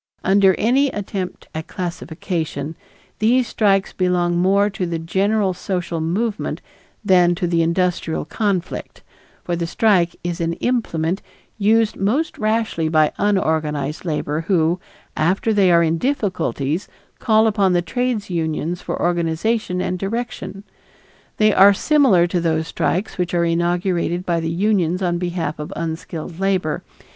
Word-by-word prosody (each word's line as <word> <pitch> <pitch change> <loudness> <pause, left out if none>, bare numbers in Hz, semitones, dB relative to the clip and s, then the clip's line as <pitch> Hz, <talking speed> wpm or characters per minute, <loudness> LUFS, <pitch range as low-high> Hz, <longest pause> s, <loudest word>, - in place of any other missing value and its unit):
Under 195 -1 +4
any 260 +6 +3
attempt 195 -4 -5
at 160 0 -5
classification 165 -3 -4 0.4
these 240 +3 +3
strikes 195 -4 +1
belong 180 -1 +1
more 195 +3 +3
to 195 -3 -3
the 170 -1 -2
general 195 +4 +1
social 180 -2 -3
movement 200 +7 -2 0.5
than 180 -2 +4
to 180 +1 -2
the 170 -1 +1
industrial 170 0 0
conflict, 200 -5 -3 0.4
for 175 - -2
the 170 0 -2
strike 180 -2 +2
is 175 -1 -3
an 165 0 0
implement 180 -6 -1 0.4
used 220 +1 +3
most 245 +12 0
rashly 215 -7 0
by 155 -1 +3
unorganized 155 -7 0
labor 155 -2 -2
who, 175 -2 +2 0.4
after 190 +7 +1
they 195 -3 +4
are 170 0 +5
in 165 0 +1
difficulties, 180 - -1 0.3
call 220 0 +3
upon 200 -4 +2
the 175 0 +2
trades 245 +3 -1
unions 165 0 -2
for - - -4
organization 175 +4 0
and 185 0 -2
direction. 195 -2 -4 0.7
They 215 -1 +4
are 195 +1 +7
similar 260 - +4
to 175 0 -1
those 160 -1 0
strikes 185 +3 -2
which 175 0 -1
are 170 0 +2
inaugurated 175 +1 0
by 170 -2 +1
the 165 0 -2
unions 185 0 +1
on 175 -1 0
behalf 175 -4 -3
of 150 - -6
unskilled 165 +1 -5
labor. 190 -5 0
180 Hz, 140 wpm, -20 LUFS, 165-205 Hz, 0.7 s, are